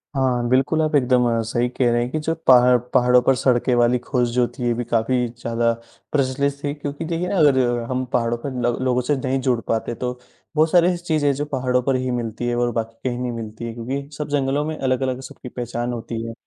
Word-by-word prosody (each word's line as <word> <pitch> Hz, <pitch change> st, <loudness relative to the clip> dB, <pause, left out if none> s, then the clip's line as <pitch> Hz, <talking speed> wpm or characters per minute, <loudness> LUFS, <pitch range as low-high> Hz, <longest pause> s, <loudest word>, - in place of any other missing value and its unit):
हाँ, 125 Hz, -3 st, +1 dB
बिल्कुल 135 Hz, +5 st, +2 dB
आप 155 Hz, -1 st, +1 dB
एकदम 125 Hz, -2 st, +3 dB, 0.2 s
सही 120 Hz, +1 st, +1 dB
कह 125 Hz, -1 st, +1 dB
रहे 120 Hz, 0 st, +2 dB
हैं 120 Hz, -, -2 dB
कि 155 Hz, -, -1 dB
जो 160 Hz, +2 st, -1 dB
पहाड़ 125 Hz, -1 st, +7 dB, 0.2 s
पहाड़ों 125 Hz, -1 st, +5 dB
पर 135 Hz, +1 st, +3 dB
सड़कें 125 Hz, 0 st, +2 dB
वाली 120 Hz, +1 st, +3 dB
खोज 125 Hz, -1 st, 0 dB
जो 120 Hz, 0 st, +2 dB
थी, 125 Hz, -, -8 dB
ये 120 Hz, -, +2 dB
भी 120 Hz, +1 st, -3 dB
काफ़ी 120 Hz, +2 st, +1 dB
ज़्यादा 115 Hz, 0 st, -1 dB, 0.4 s
प्रचलित 140 Hz, 0 st, +1 dB
थी। 145 Hz, 0 st, -1 dB
क्योंकि 145 Hz, +2 st, -5 dB
देखिए 170 Hz, +2 st, -2 dB
ना, 200 Hz, -, -1 dB
अगर 145 Hz, -4 st, +5 dB, 0.3 s
हम 130 Hz, 0 st, -1 dB
पहाड़ों 115 Hz, 0 st, +1 dB
पर 135 Hz, +3 st, -5 dB
ल 120 Hz, -, +1 dB
लोगों 125 Hz, 0 st, +2 dB
से 145 Hz, +4 st, 0 dB
नहीं 130 Hz, +1 st, -1 dB
जुड़ 125 Hz, -3 st, +1 dB
पाते 115 Hz, +1 st, -1 dB
तो 125 Hz, +1 st, -3 dB, 0.4 s
बहुत 155 Hz, +1 st, +3 dB
सारी 175 Hz, -1 st, +5 dB
ऐसी 180 Hz, -1 st, +1 dB
चीज़ें 150 Hz, -3 st, +2 dB
जो 145 Hz, +2 st, -3 dB
पहाड़ों 130 Hz, -3 st, 0 dB
पर 135 Hz, 0 st, +1 dB
ही 130 Hz, 0 st, -1 dB
मिलती 120 Hz, 0 st, -3 dB
है 120 Hz, -, 0 dB
और 120 Hz, 0 st, +1 dB
बाकी 115 Hz, +2 st, -4 dB
कहीं 120 Hz, 0 st, -4 dB
नहीं 125 Hz, -1 st, -2 dB
मिलती 115 Hz, 0 st, -6 dB
है, 115 Hz, -, -5 dB
क्योंकि 135 Hz, +5 st, -5 dB
सब 150 Hz, -1 st, -3 dB
जंगलों 140 Hz, 0 st, 0 dB
में 155 Hz, 0 st, -4 dB
अलग-अलग 130 Hz, 0 st, -1 dB
सबकी 125 Hz, -1 st, -10 dB
पहचान 120 Hz, 0 st, -4 dB
होती 115 Hz, -1 st, -5 dB
है। 115 Hz, -, -5 dB
125 Hz, 230 wpm, -22 LUFS, 120-140 Hz, 0.4 s, पहाड़